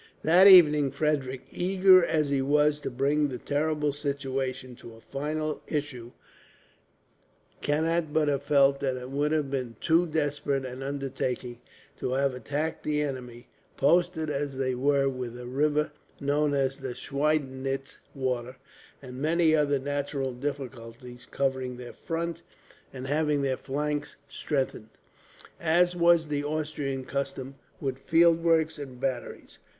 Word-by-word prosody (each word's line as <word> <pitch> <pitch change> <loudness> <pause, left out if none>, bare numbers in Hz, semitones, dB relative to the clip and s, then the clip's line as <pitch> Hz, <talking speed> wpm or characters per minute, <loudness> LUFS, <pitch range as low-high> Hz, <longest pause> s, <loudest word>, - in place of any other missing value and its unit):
That 175 +5 +7
evening 150 -7 +8
Frederick, 135 -2 -1
eager 185 0 +5
as 155 -3 +1
he 140 -1 +2
was 150 +2 +2
to - - -4
bring 140 +4 +1
the 130 -3 -5
terrible 150 +1 -1
situation 135 -3 -3
to 115 - -12
a - - -15
final 150 +4 -3
issue, 140 -6 -4 1.5
cannot 160 +2 0
but 155 -1 +2
have 140 -1 +1
felt 140 -1 +3
that 135 -2 -1
it 125 +1 -8
would 145 +2 0
have 150 -3 0
been 125 -4 -3
too 170 +2 +3
desperate 145 -3 -1
an 130 +1 -7
undertaking 135 -3 -4 0.4
to 125 - -2
have 135 0 +1
attacked 145 +6 -3
the 150 -1 0
enemy; 125 -4 -6 0.3
posted 165 +1 +2
as 140 -1 -3
they 130 -1 0
were 140 +2 +2
with 125 -3 -4
a 125 - -8
river 150 +4 0 0.3
(known 145 +1 +1
as 135 -1 0 0.2
Schweidnitz 135 -2 -2 0.2
Water) 125 -2 -2 0.5
and 130 0 -8
many 160 +1 +3
other 145 -2 +2
natural 140 -1 -3
difficulties 125 -2 -7
covering 130 -2 -2
their 125 -1 -9
front, 170 0 -4 0.5
and 130 -1 -7
having 150 0 +1
their 135 -1 +1
flanks 145 +2 -3
strengthened, 135 -6 -3 0.7
as 175 +2 +3
was 170 -2 +4
the 145 -1 -1
Austrian 145 -3 -3
custom, 135 -1 -4 0.3
with 135 -2 -3
field 165 +2 +4
works 160 -2 +2
and 130 -3 -8
batteries. 130 -2 -4
140 Hz, 135 wpm, -27 LUFS, 130-150 Hz, 1.5 s, evening